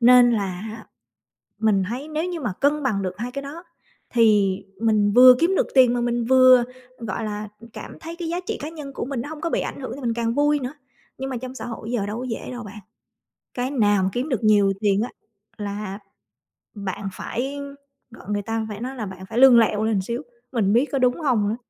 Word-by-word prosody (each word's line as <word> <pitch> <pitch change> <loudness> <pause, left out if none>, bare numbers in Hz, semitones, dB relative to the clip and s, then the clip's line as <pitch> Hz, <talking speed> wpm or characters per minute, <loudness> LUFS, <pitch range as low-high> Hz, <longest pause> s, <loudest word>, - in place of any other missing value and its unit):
Nên 245 0 +7
là 205 -4 0
hạ 215 +5 -7 0.7
mình 210 -3 +3
thấy 255 +6 -5
nếu 310 +2 -2
như 355 -2 -4
mà 215 -7 -2
cân 290 +1 +2
bằng 215 -7 0
được 185 -2 -3
2 245 +3 -4
cái 275 +1 -4
đó 295 +5 -8 0.5
thì 210 -5 +4 0.2
mình 210 -2 +3
vừa 250 +1 +9
kiếm 360 +3 +2
được - - +2
tiền, 255 -2 +6
mà 245 - 0
mình 240 -1 0
vừa, 255 0 +7 0.4
gọi 225 -1 -4
là, 210 0 -4 0.3
cảm - - -9
thấy 330 +1 -8
cái 340 -1 -5
giá 345 - -1
trị - - -2
cá 300 - -4
nhân 300 -4 -9
của - - -4
mình 265 -3 -3
nó 290 - -7
hông 310 -1 -8
có 335 - -1
bị - - 0
ảnh - - -5
hưởng 260 - -5
thì 280 - -9
mình 235 -3 0
càng 230 0 -1
vui 290 +2 +2
nữa. 260 +2 -5 0.4
Nhưng 265 0 -4
mà 255 - -3
trong 255 +2 -7
xã - - -6
hội 230 0 -6
giờ 215 -5 0
đâu 210 +3 -4
có 255 - -4
dễ 225 - -5
đâu 245 -1 -6
bạn, 210 0 -10 0.7
cái 255 +2 -2
nào 205 -7 +3
mà 190 - +1
kiếm 255 +6 -2
được 240 -4 -1
nhiều 205 -2 +4
tiền 205 -1 +2
á 240 - -2 0.5
là 205 -1 -5 0.8
bạn 195 -1 -4
phải 270 +8 -4 0.5
gọi 215 - -14
người 205 0 0
ta, 225 +1 -3
phải 210 0 -6
nói 260 +2 -4
là 225 -5 -4
bạn 190 -1 -9
phải 225 - -5
lươn 260 -2 +8
lẹo 215 -1 +2
lên 220 -3 +1
xíu, 235 +6 -4 0.3
mình 210 -5 +1
biết 245 +5 +4
có 275 - 0
đúng 250 +5 +2
hông 225 -8 +2
nữa, 220 - -1
235 Hz, 235 wpm, -23 LUFS, 210-265 Hz, 0.8 s, vừa